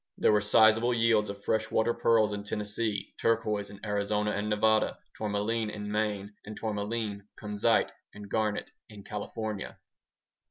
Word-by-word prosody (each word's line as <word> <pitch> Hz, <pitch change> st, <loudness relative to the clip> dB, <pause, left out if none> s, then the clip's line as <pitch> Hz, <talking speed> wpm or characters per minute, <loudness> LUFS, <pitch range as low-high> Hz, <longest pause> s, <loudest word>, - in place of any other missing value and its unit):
There -, -, +4 dB
were 105 Hz, -1 st, +4 dB
sizeable 110 Hz, +3 st, +5 dB
yields 115 Hz, -2 st, +3 dB
of 100 Hz, 0 st, -7 dB
freshwater 110 Hz, +2 st, +1 dB
pearls 110 Hz, -3 st, +3 dB
in 100 Hz, 0 st, -4 dB
Tennessee, 105 Hz, +1 st, -2 dB
turquoise 105 Hz, -3 st, +1 dB
in 100 Hz, +1 st, -10 dB
Arizona 105 Hz, 0 st, 0 dB
and 105 Hz, +1 st, -2 dB
Nevada, 110 Hz, +1 st, +2 dB, 0.2 s
tourmaline 105 Hz, +1 st, -1 dB
in 105 Hz, -1 st, -5 dB
Maine, 105 Hz, -1 st, -1 dB
and 110 Hz, 0 st, -8 dB
tourmaline, 105 Hz, -1 st, -3 dB
kunzite, 105 Hz, +2 st, +1 dB, 0.2 s
and 105 Hz, -1 st, -10 dB
garnet 105 Hz, 0 st, -1 dB, 0.2 s
in 105 Hz, -2 st, -11 dB
California. 105 Hz, 0 st, -5 dB
105 Hz, 135 wpm, -29 LUFS, 105-110 Hz, 0.2 s, sizeable